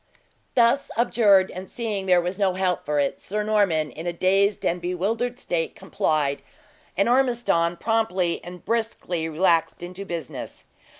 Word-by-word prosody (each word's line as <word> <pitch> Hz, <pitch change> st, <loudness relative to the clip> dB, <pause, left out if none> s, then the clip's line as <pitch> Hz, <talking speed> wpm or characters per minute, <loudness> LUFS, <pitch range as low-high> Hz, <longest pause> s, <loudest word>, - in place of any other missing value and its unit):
Thus 240 Hz, +3 st, +3 dB
abjured, 210 Hz, -5 st, +4 dB
and 185 Hz, +1 st, -8 dB
seeing 210 Hz, -5 st, -3 dB
there 180 Hz, -1 st, +5 dB
was 180 Hz, +3 st, -3 dB
no 190 Hz, -2 st, +2 dB
help 185 Hz, -5 st, -1 dB
for 150 Hz, -1 st, +1 dB
it, 140 Hz, -, -1 dB
Sir 210 Hz, +2 st, -2 dB
Norman, 195 Hz, -8 st, +1 dB
in 160 Hz, +3 st, -7 dB
a -, -, +1 dB
dazed 195 Hz, +4 st, +2 dB
and 175 Hz, +1 st, 0 dB
bewildered 210 Hz, +8 st, -2 dB
state, 170 Hz, -7 st, -2 dB
complied; 145 Hz, -3 st, -1 dB, 0.6 s
and 200 Hz, -, +3 dB
Ormiston 240 Hz, -10 st, +2 dB
promptly 190 Hz, -5 st, 0 dB
and 180 Hz, 0 st, -10 dB
briskly 210 Hz, -7 st, -2 dB
relaxed 165 Hz, +1 st, +1 dB
into 180 Hz, +2 st, -7 dB
business. 170 Hz, -7 st, -7 dB
185 Hz, 145 wpm, -24 LUFS, 170-215 Hz, 0.6 s, there